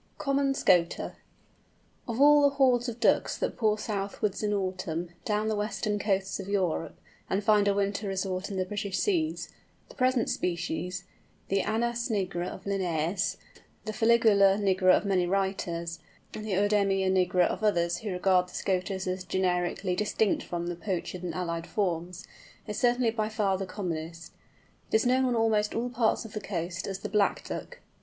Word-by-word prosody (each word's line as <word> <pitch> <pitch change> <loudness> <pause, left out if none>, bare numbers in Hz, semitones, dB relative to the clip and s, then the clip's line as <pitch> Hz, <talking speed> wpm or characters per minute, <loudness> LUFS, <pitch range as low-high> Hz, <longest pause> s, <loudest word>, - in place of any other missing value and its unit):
COMMON 275 -1 +1
SCOTER. 175 -8 +2 0.9
Of 230 0 -3
all 295 +1 +7
the 285 -1 +3
hordes 255 -3 +3
of 235 0 -7
Ducks 235 - +2
that - - -2
pour 215 -2 +2
southwards 200 -1 -2
in 210 -1 0
autumn, 185 -4 -2 0.2
down 210 -2 0
the 220 - 0
western 210 0 -2
coasts 195 -2 -1
of 195 0 -6
Europe, 185 -5 -1 0.3
and 195 +2 0
find 210 -1 +4
a 200 - +4
winter 200 +1 -1
resort 190 0 -2
in 195 - -4
the 185 - 0
British 200 -1 -3
Seas, 330 -5 0 0.4
the - - -12
present 255 -2 +2
species, 180 +1 -2 0.5
the 195 0 +2
Anas 235 +2 -1
nigra 185 -4 -1
of - - -9
Linnæus, 185 -1 -1 0.5
the 215 - -2
Fuligula 215 -4 +5
nigra 190 -2 +4
of - - -4
many 185 -3 +2
writers, 175 -3 -2 0.3
and 215 0 -6
Œdemia 195 -1 +2
nigra 180 -1 +3
of 215 - -3
others 170 -5 +2
who 215 - -5
regard 180 -1 +2
the - - -12
Scoters 190 0 -1
as 185 0 -2
generically 180 0 0
distinct 210 +1 +1
from 175 -1 -4
the 175 0 -3
Pochard 180 -1 -4
and 175 -3 -4
allied 170 -2 -3
forms, 180 -3 -2 0.4
is 210 -2 -4
certainly 245 -1 +3
by 215 -1 -1
far 210 -3 +1
the 190 0 -4
commonest. 165 -4 -5 0.6
It - - +2
is 220 - +3
known 255 +1 +3
on 250 -1 +1
almost 220 -2 +1
all 245 +2 -1
parts 230 -1 +1
of 220 - -10
the 215 - -4
coast 175 -2 -4
as 195 -1 -3
the - - -3
"Black 205 -1 +1
Duck." - - -7
195 Hz, 170 wpm, -28 LUFS, 180-220 Hz, 0.9 s, all